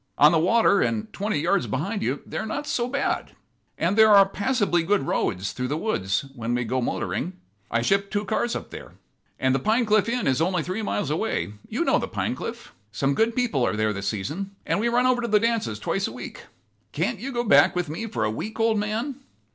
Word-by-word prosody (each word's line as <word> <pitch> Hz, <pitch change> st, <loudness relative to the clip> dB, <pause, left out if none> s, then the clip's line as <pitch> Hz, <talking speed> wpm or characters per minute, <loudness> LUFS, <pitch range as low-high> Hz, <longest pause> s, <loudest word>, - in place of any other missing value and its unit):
On 150 Hz, +2 st, +7 dB
the 165 Hz, -, +3 dB
water, 200 Hz, +4 st, +4 dB
and 220 Hz, -1 st, -1 dB
twenty 205 Hz, -4 st, -1 dB
yards 170 Hz, -5 st, +1 dB
behind 185 Hz, -, -2 dB
you, 130 Hz, +4 st, -2 dB
they -, -, -5 dB
are -, -, -3 dB
not 285 Hz, +7 st, -3 dB
so 240 Hz, -4 st, -1 dB
bad. 275 Hz, +2 st, -2 dB, 0.4 s
And 175 Hz, +4 st, +1 dB
there 220 Hz, 0 st, +7 dB
are 200 Hz, -2 st, +7 dB
passably 205 Hz, -4 st, +1 dB
good 200 Hz, 0 st, +1 dB
roads 95 Hz, -7 st, -1 dB
through 125 Hz, 0 st, -3 dB
the 145 Hz, +4 st, -2 dB
woods 140 Hz, -, -1 dB
where 115 Hz, -3 st, -6 dB
we 120 Hz, 0 st, +1 dB
go 130 Hz, +3 st, -1 dB
motoring. 120 Hz, -, -2 dB, 0.4 s
I 115 Hz, -, 0 dB
shipped 200 Hz, +7 st, +1 dB
two 205 Hz, 0 st, -1 dB
cars 235 Hz, +4 st, -1 dB
up -, -, -6 dB
there. -, -, -9 dB, 0.5 s
And 130 Hz, 0 st, +2 dB
the 135 Hz, -, +2 dB
Pinecliff 215 Hz, -, +2 dB
Inn 245 Hz, +1 st, -1 dB
is 130 Hz, +2 st, +2 dB
only 180 Hz, -1 st, +1 dB
three 185 Hz, +6 st, -3 dB
miles 205 Hz, -5 st, -2 dB
away. 155 Hz, -, -1 dB, 0.2 s
You -, -, -1 dB
know -, -, +3 dB
the -, -, -3 dB
Pinecliff. -, -, -4 dB, 0.2 s
Some 135 Hz, +6 st, 0 dB
good 225 Hz, +7 st, +1 dB
people 240 Hz, -, +1 dB
are 110 Hz, -, +1 dB
there 110 Hz, 0 st, +1 dB
this 100 Hz, 0 st, -4 dB
season, 150 Hz, -, -4 dB
and -, -, 0 dB
we 230 Hz, -, +1 dB
run 245 Hz, +1 st, +2 dB
over 255 Hz, -1 st, +3 dB
to 235 Hz, -, -2 dB
the 210 Hz, -1 st, +4 dB
dances 230 Hz, 0 st, 0 dB
twice -, -, -1 dB
a -, -, -6 dB
week. -, -, -9 dB, 0.5 s
Can't 235 Hz, -, -1 dB
you 265 Hz, +5 st, -5 dB
go 240 Hz, -2 st, -1 dB
back 145 Hz, -10 st, +5 dB
with 180 Hz, -1 st, -1 dB
me 165 Hz, +10 st, -4 dB
for 115 Hz, -, -2 dB
a 110 Hz, -, +1 dB
week, 215 Hz, -, -6 dB
old 225 Hz, -1 st, +2 dB
man?" 225 Hz, +6 st, -2 dB
200 Hz, 225 wpm, -25 LUFS, 135-225 Hz, 0.5 s, On